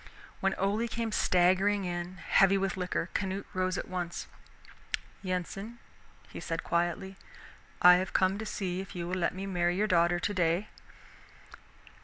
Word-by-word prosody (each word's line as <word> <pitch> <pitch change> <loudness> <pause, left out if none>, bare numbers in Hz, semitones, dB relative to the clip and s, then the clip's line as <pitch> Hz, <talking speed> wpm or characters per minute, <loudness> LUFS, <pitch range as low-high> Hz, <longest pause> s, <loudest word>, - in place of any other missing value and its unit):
When 195 0 +1
Ole 205 +4 0
came 230 -1 -3
staggering 190 +2 +3
in, 175 +1 -4
heavy 195 +2 +4
with 195 -1 -1
liquor, 180 -1 -2
Canute 195 0 -2
rose 185 0 0
at - - -4
once. 175 -2 -4 1.0
"Yensen," 195 +4 -4 0.5
he - - -8
said 165 0 -3
quietly, 175 +3 -1 0.7
"I 180 0 +9
have 185 0 -2
come 190 +2 +2
to 220 - -4
see 185 -3 -3
if 195 0 -10
you 170 -1 -3
will 180 - -4
let 175 - 0
me 190 +1 -4
marry 175 -2 +1
your 205 +3 +2
daughter 175 -3 +3
today." 180 +1 0
185 Hz, 150 wpm, -30 LUFS, 175-195 Hz, 1.0 s, I